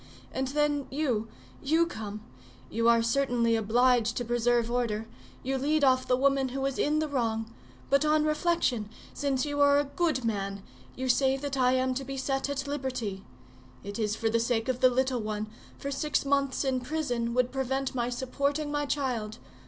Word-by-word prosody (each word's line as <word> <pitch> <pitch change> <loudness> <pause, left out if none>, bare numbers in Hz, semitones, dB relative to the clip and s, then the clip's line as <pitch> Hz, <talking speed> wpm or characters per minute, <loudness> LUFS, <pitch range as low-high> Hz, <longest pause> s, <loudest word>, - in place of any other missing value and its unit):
And 265 0 -1
then, 290 0 0
you, 255 -7 -1 0.3
you 320 +4 +3
come; 215 -9 -6 0.5
you 230 +1 +2
are 230 -1 +4
certainly 235 -2 +2
obliged 235 +1 +2
to 245 - -2
preserve 240 0 +1
order, 225 -3 -1 0.4
you 265 +1 -1
lead 295 +2 +1
off 255 -1 +4
the 250 - +3
woman 275 0 +2
who 270 +2 -2
is 275 -1 -2
in 300 +1 +2
the 310 0 0
wrong; 230 -5 -2 0.4
but 280 +1 +4
on 305 0 +3
reflection, 305 -8 +1 0.2
since 275 -1 0
you 290 -1 -1
are 285 0 +6
a 290 - +3
good 285 -3 -1
man, 200 -3 -2 0.3
you 260 +1 -3
say 265 +1 +3
that 280 0 -4
I 255 -1 +3
am 260 0 +1
to 270 +2 -3
be 270 0 -6
set 270 +1 -1
at 280 0 -2
liberty; 255 -9 -3 0.6
it 200 +3 -6
is 210 -1 0
for 225 - -1
the 230 +1 +2
sake 230 0 0
of 255 -1 -1
the 255 -1 +6
little 255 -1 0
one, 215 0 -3 0.3
for 280 - -5
six 290 +1 0
months 275 -1 +1
in 260 -1 +1
prison 245 -5 -2
would 250 0 +2
prevent 265 0 -1
my 240 -1 -1
supporting 280 +4 -1
my 290 0 -1
child. 240 -7 -2
260 Hz, 185 wpm, -29 LUFS, 235-280 Hz, 0.6 s, are